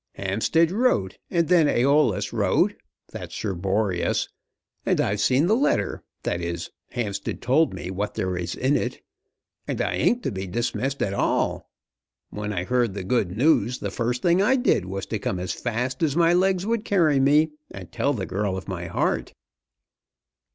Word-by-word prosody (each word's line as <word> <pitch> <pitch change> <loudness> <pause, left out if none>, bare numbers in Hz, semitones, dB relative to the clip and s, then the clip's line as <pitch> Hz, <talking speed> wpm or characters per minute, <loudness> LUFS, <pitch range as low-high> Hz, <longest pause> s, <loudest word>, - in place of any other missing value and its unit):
Hampstead 110 - +1
wrote, 190 - +1
and 170 -3 +1
then 170 -4 +5
Æolus 140 +4 +2
wrote, - - +2 0.4
that's - - -7
Sir 100 -3 -2
Boreas, 95 0 0 0.5
and - - +1
I've 100 +1 +1
seen 130 +8 +3
the 210 +5 +3
letter, 275 +5 0 0.2
that 85 - -1
is, 85 0 -4 0.2
Hampstead 100 -4 -3
told 145 +6 +2
me 90 - -6
what 100 +2 -3
there 95 -1 -1
is 90 -1 -3
in 135 +3 +1
it; - - -2 0.6
and - - -3
I - - 0
ain't 245 0 +1
to - - -1
be 95 -1 -5
dismissed 120 +6 -2
at 100 - -1
all. - - 0 0.6
When 105 0 -4
I 90 -4 -2
heard 120 -1 0
the 100 - -4
good 100 -3 0
news 125 -3 +3
the - - -4
first 120 +1 -2
thing 175 +2 +4
I 220 +6 +4
did 245 - +2
was 95 +1 -4
to 110 - -3
come 95 - -2
as 90 0 -3
fast 125 +2 -3
as 150 -4 +1
my 170 0 +4
legs 185 +1 +2
would 225 0 0
carry 165 -10 +3
me, 150 +3 +4 0.2
and 95 -3 -10
tell - - 0
the - - -3
girl 100 -1 -2
of 95 - -8
my 90 -3 -4
heart." 85 - -1
120 Hz, 180 wpm, -24 LUFS, 95-160 Hz, 0.6 s, then